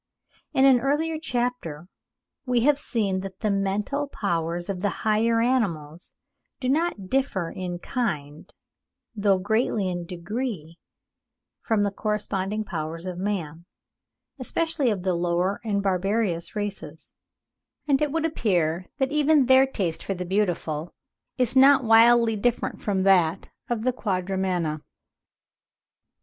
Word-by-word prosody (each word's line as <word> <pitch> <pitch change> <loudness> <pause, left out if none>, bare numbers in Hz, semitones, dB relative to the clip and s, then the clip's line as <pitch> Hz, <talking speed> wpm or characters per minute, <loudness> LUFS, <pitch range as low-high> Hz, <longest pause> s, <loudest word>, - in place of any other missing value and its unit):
In 265 - +5
an 265 -2 +6
earlier 305 +5 0
chapter 240 - -3 0.6
we 245 -1 +2
have 290 +3 +3
seen 200 -8 -1
that 190 0 -8
the 215 -2 +1
mental 200 +9 -1
powers 175 - -2
of 195 -3 -4
the 205 - +1 0.2
higher 225 +2 +3
animals 180 - -1 0.4
do 255 - -2
not 290 - 0
differ 205 -9 -1
in 180 -1 -5
kind, 155 - -4 0.6
though 200 -2 +3
greatly 210 +1 0
in 175 -1 -4
degree, 180 -2 -5 0.8
from 220 -3 +1
the 200 - 0
corresponding 210 0 -2
powers 165 -2 -5
of 180 -1 -5
man, 170 -5 -3 0.7
especially 315 +1 0
of 200 -5 -2
the 185 -1 +1
lower 175 +3 0
and 200 -3 -1
barbarous 195 -1 -1
races; 205 -1 -6 0.7
and 280 -1 +2
it 300 -2 +1
would 325 +1 0
appear 180 - 0
that 265 -1 0
even 300 -1 +4
their 260 +1 +6
taste 175 -10 -2
for 195 - -3
the 180 0 -5
beautiful 175 -5 -1 0.4
is 250 -1 +1
not 270 +1 +7
widely 230 0 +6
different 240 +3 -1
from 195 -2 0
that 185 -2 +3 0.2
of 235 -2 -1
the 255 +1 +1
Quadrumana. 185 -6 -1
205 Hz, 130 wpm, -25 LUFS, 180-245 Hz, 0.8 s, not